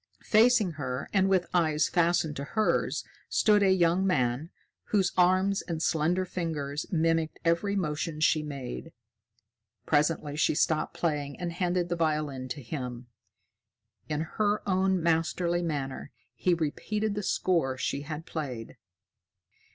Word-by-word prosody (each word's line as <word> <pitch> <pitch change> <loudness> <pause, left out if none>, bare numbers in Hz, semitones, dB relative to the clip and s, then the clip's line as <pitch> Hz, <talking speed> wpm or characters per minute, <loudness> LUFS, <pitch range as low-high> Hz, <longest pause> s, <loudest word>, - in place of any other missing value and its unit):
Facing 220 -3 +4
her, 130 0 -3
and 195 -1 +3
with 185 -2 +3
eyes 155 -3 +2
fastened 170 -3 +1
to 140 - -4
hers, 215 +9 0 0.3
stood 210 -2 +4
a 195 -1 +4
young 180 0 +3
man, 140 -4 0 0.4
whose 195 -4 +1
arms 185 +2 +3
and 165 -3 -4
slender 165 +3 +1
fingers 155 -5 -3
mimicked 165 -2 +1
every 170 +5 +1
motion 155 -3 -2
she 155 0 +3
made. 145 +2 -6 0.9
Presently 150 -1 +1
she 155 - +2
stopped 155 +1 +1
playing 145 -4 -2
and 175 -1 -3
handed 175 0 0
the 175 - 0
violin 150 -5 -1
to 135 +2 -6
him. 125 -2 -6 1.0
In 150 0 -1
her 205 +6 -1
own 190 -2 +2
masterly 170 +1 +1
manner, 145 -5 -3 0.2
he 180 -1 +1
repeated 210 +7 -2
the 205 - -2
score 165 -9 0
she 140 +1 -2
had 155 +2 -6
played. 130 -10 -6
165 Hz, 135 wpm, -28 LUFS, 150-185 Hz, 1.0 s, Facing